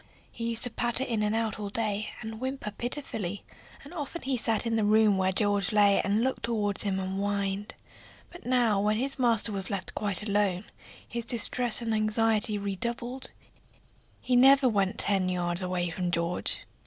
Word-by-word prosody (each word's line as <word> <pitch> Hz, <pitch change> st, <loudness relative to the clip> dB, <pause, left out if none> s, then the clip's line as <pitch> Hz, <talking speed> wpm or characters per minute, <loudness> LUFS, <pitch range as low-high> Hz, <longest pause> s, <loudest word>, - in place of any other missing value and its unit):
He 230 Hz, 0 st, -4 dB
used 230 Hz, 0 st, +2 dB
to 245 Hz, -, 0 dB
patter 240 Hz, +2 st, -1 dB
in 230 Hz, -5 st, -2 dB
and 210 Hz, +1 st, 0 dB
out 225 Hz, -2 st, -2 dB
all 205 Hz, -1 st, -4 dB
day, 215 Hz, 0 st, -2 dB
and 220 Hz, -1 st, -7 dB
whimper 260 Hz, -4 st, -4 dB
pitifully, 215 Hz, -5 st, -4 dB, 0.4 s
and 285 Hz, -, -12 dB
often 330 Hz, +1 st, -6 dB
he 265 Hz, 0 st, 0 dB
sat 225 Hz, -1 st, +1 dB
in 230 Hz, -1 st, 0 dB
the 220 Hz, -, +1 dB
room 215 Hz, 0 st, +4 dB
where 190 Hz, 0 st, +1 dB
George 205 Hz, 0 st, +1 dB
lay 205 Hz, -2 st, +4 dB
and 205 Hz, +3 st, 0 dB
looked 260 Hz, +1 st, -1 dB
toward 210 Hz, -4 st, -1 dB
him 195 Hz, -2 st, +1 dB
and 190 Hz, +1 st, -3 dB
whined. 200 Hz, 0 st, -2 dB, 0.6 s
But 350 Hz, -, -12 dB
now 240 Hz, -5 st, +2 dB
when 210 Hz, +1 st, +1 dB
his 270 Hz, +3 st, -3 dB
master 230 Hz, -3 st, +3 dB
was 195 Hz, -2 st, -2 dB
left 200 Hz, -3 st, -4 dB
quite 205 Hz, -2 st, -2 dB
alone 200 Hz, -3 st, 0 dB, 0.4 s
his 235 Hz, 0 st, -4 dB
distress 240 Hz, 0 st, +4 dB
and 225 Hz, -1 st, -1 dB
anxiety 215 Hz, 0 st, +2 dB
redoubled; 235 Hz, +6 st, -3 dB, 0.9 s
he 250 Hz, -, 0 dB
never 270 Hz, +2 st, +6 dB
went 200 Hz, -3 st, 0 dB
ten 195 Hz, -2 st, +1 dB
yards 175 Hz, 0 st, 0 dB
away 180 Hz, -1 st, -2 dB
from 180 Hz, +1 st, -3 dB
George. 170 Hz, +1 st, -2 dB
215 Hz, 180 wpm, -28 LUFS, 200-235 Hz, 0.9 s, never